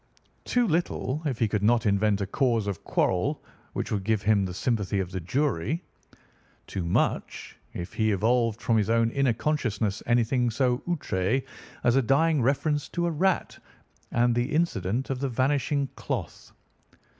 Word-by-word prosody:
Too 245 Hz, -1 st, +2 dB
little, 155 Hz, -4 st, -1 dB
if 130 Hz, -5 st, -2 dB
he 115 Hz, -, +2 dB
could 105 Hz, -1 st, -1 dB
not 115 Hz, +2 st, +3 dB
invent 100 Hz, 0 st, +2 dB
a -, -, 0 dB
cause 115 Hz, +1 st, +1 dB
of 100 Hz, -4 st, -4 dB
quarrel -, -, 0 dB, 0.3 s
which -, -, -3 dB
would 100 Hz, -2 st, -1 dB
give 110 Hz, 0 st, 0 dB
him 105 Hz, -1 st, +3 dB
the 90 Hz, -, -5 dB
sympathy 105 Hz, -3 st, 0 dB
of 95 Hz, -1 st, -3 dB
the 95 Hz, -, -3 dB
jury; 140 Hz, -, -1 dB, 0.8 s
too 95 Hz, -, -4 dB
much, 85 Hz, -, -1 dB, 0.2 s
if 85 Hz, +1 st, -6 dB
he 110 Hz, -1 st, +1 dB
evolved 115 Hz, +2 st, +1 dB
from 115 Hz, -2 st, +2 dB
his 105 Hz, 0 st, +1 dB
own 115 Hz, 0 st, +3 dB
inner 135 Hz, -2 st, +2 dB
consciousness 110 Hz, -7 st, -1 dB
anything 120 Hz, +1 st, +2 dB
so 125 Hz, +1 st, +1 dB
outré 130 Hz, -, 0 dB, 0.4 s
as 120 Hz, 0 st, +3 dB
a -, -, +5 dB
dying 145 Hz, +4 st, +3 dB
reference 145 Hz, +3 st, 0 dB
to 175 Hz, -, -1 dB
a 170 Hz, -, 0 dB
rat, 180 Hz, +4 st, 0 dB, 0.5 s
and 120 Hz, 0 st, +3 dB
the 120 Hz, +4 st, 0 dB
incident 125 Hz, -, 0 dB
of 130 Hz, -, -2 dB
the 135 Hz, 0 st, -1 dB
vanishing 140 Hz, +3 st, +1 dB
cloth. -, -, -5 dB
120 Hz, 165 wpm, -27 LUFS, 105-140 Hz, 0.8 s, a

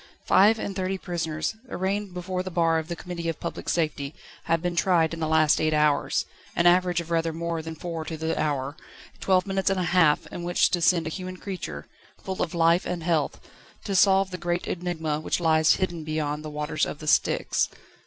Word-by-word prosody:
Five 210 Hz, +4 st, +5 dB
and 200 Hz, -3 st, -4 dB
thirty 190 Hz, 0 st, -1 dB
prisoners, 165 Hz, +1 st, -3 dB
arraigned 195 Hz, 0 st, -2 dB
before 180 Hz, +1 st, -3 dB
the 185 Hz, -, -5 dB
bar 165 Hz, -2 st, +2 dB
of 160 Hz, -, -6 dB
the 170 Hz, -, -4 dB
Committee 170 Hz, -1 st, -5 dB
of 165 Hz, -, -4 dB
Public 170 Hz, -, -5 dB
Safety, 155 Hz, -3 st, -1 dB, 0.3 s
had 165 Hz, 0 st, +2 dB
been 175 Hz, +1 st, -2 dB
tried 170 Hz, -1 st, +3 dB
in 165 Hz, -, -5 dB
the 160 Hz, -, -1 dB
last 155 Hz, -1 st, +3 dB
eight 155 Hz, 0 st, +2 dB
hours 150 Hz, -1 st, +2 dB, 0.3 s
an 170 Hz, -, +2 dB
average 175 Hz, 0 st, +4 dB
of 170 Hz, 0 st, -10 dB
rather 165 Hz, 0 st, +1 dB
more 165 Hz, 0 st, -3 dB
than 160 Hz, 0 st, -7 dB
four 165 Hz, 0 st, -5 dB
to 160 Hz, 0 st, -5 dB
the 160 Hz, +1 st, -1 dB
hour; 140 Hz, -1 st, -1 dB, 0.4 s
twelve 185 Hz, -1 st, +2 dB
minutes 195 Hz, -1 st, 0 dB
and 195 Hz, -1 st, 0 dB
a -, -, 0 dB
half 165 Hz, -5 st, +4 dB
in -, -, -6 dB
which 175 Hz, +1 st, +2 dB
to 175 Hz, -, 0 dB
send 170 Hz, -1 st, +3 dB
a 160 Hz, -, -3 dB
human 185 Hz, +3 st, -6 dB
creature, 175 Hz, -, -6 dB, 0.3 s
full 190 Hz, -1 st, -5 dB
of 170 Hz, -, -2 dB
life 170 Hz, +2 st, +3 dB
and 175 Hz, -2 st, -3 dB
health, 160 Hz, -4 st, 0 dB, 0.4 s
to 200 Hz, -, -2 dB
solve 190 Hz, 0 st, +4 dB
the 180 Hz, -, -5 dB
great 175 Hz, 0 st, -1 dB
enigma 160 Hz, -4 st, -2 dB
which 155 Hz, -, -1 dB
lies 160 Hz, -2 st, +4 dB
hidden 175 Hz, -4 st, -2 dB
beyond 155 Hz, -1 st, -2 dB
the 155 Hz, -, -5 dB
waters 150 Hz, +1 st, -2 dB
of -, -, -5 dB
the 155 Hz, -, -10 dB
Styx. 150 Hz, -, +2 dB
170 Hz, 210 wpm, -26 LUFS, 155-180 Hz, 0.4 s, Five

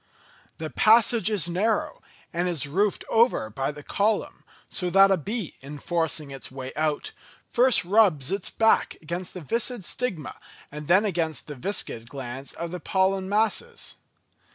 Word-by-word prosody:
The 155 Hz, -1 st, -5 dB
passage 225 Hz, 0 st, +5 dB
is 200 Hz, -6 st, +2 dB
narrow, 205 Hz, +5 st, -1 dB, 0.3 s
and 175 Hz, +1 st, 0 dB
is 155 Hz, -5 st, 0 dB
roofed 195 Hz, +8 st, 0 dB
over 225 Hz, -, +2 dB
by 135 Hz, +5 st, -2 dB
the 145 Hz, 0 st, -11 dB
column, 210 Hz, +6 st, -1 dB, 0.2 s
so 180 Hz, -2 st, -2 dB
that 195 Hz, +2 st, +6 dB
a -, -, +5 dB
bee, 200 Hz, +2 st, -5 dB
in 145 Hz, +2 st, -8 dB
forcing 160 Hz, -2 st, -1 dB
its 135 Hz, -1 st, -4 dB
way 130 Hz, 0 st, -7 dB
out, 155 Hz, -1 st, -1 dB, 0.4 s
first 250 Hz, -5 st, +4 dB
rubs 180 Hz, -8 st, +3 dB
its 195 Hz, -1 st, -1 dB
back 225 Hz, 0 st, +2 dB
against 175 Hz, +4 st, -5 dB
the 180 Hz, -, -6 dB
viscid 230 Hz, -, -1 dB
stigma 190 Hz, -, -3 dB, 0.3 s
and 150 Hz, 0 st, -8 dB
then 190 Hz, +5 st, +4 dB
against 165 Hz, -5 st, -1 dB
the 150 Hz, -, -7 dB
viscid 125 Hz, -, -3 dB
glands 135 Hz, 0 st, -6 dB
of 170 Hz, 0 st, -5 dB
the 180 Hz, -, -5 dB
pollen 190 Hz, 0 st, 0 dB
masses. 225 Hz, -, -1 dB
180 Hz, 155 wpm, -25 LUFS, 150-210 Hz, 0.4 s, that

